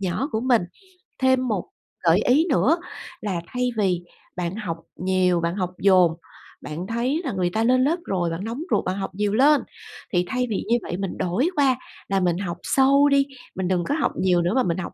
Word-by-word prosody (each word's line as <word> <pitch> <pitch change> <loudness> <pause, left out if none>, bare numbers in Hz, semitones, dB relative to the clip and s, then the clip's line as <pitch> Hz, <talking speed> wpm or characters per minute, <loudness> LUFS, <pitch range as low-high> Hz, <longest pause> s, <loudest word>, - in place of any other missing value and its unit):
nhỏ 195 +9 -1
của 220 - 0
mình. 245 -4 +3 0.6
Thêm 260 -1 +2
một 205 -6 -1 0.4
gợi 170 0 +5
ý 285 +6 +4
nữa 295 +4 +3 0.4
là 190 -5 -2
thay 250 0 -1
vì 185 -4 +1 0.3
bạn 175 +1 -3
học 185 -7 -4 0.2
nhiều, 185 -1 +1
bạn 170 +1 -1
học 180 -2 -2
dồn, 185 -4 +5 0.5
bạn 170 +5 -6
thấy 250 +8 -1
là 270 - -1
người 180 -2 0
ta 220 - +1
lên 255 +2 +4
lớp 320 +6 +2
rồi, 180 -3 -1
bạn 165 +3 -4
nóng 230 +7 -4
ruột, - - +2
bạn 185 - -1
học 190 -1 -5
nhiều 205 0 0
lên, 285 +6 +5 0.5
thì 180 0 +2
thay 250 +4 -1
vì 205 - -2
như 235 - +3
vậy 175 - -5
mình 195 -2 -4
đổi 220 - 0
qua 275 -3 +3 0.3
là 195 0 +1
mình 175 -2 +1
học 175 -4 -4
sâu 275 +2 +4
đi, 280 0 +4 0.3
mình 190 -1 -2
đừng 180 -1 +1
có 285 - -1
học 300 -5 0
nhiều 180 -2 +2
nữa 175 +3 0
mà 260 - +3
mình 170 -5 -1
học 185 - -5
200 Hz, 215 wpm, -23 LUFS, 180-255 Hz, 0.6 s, gợi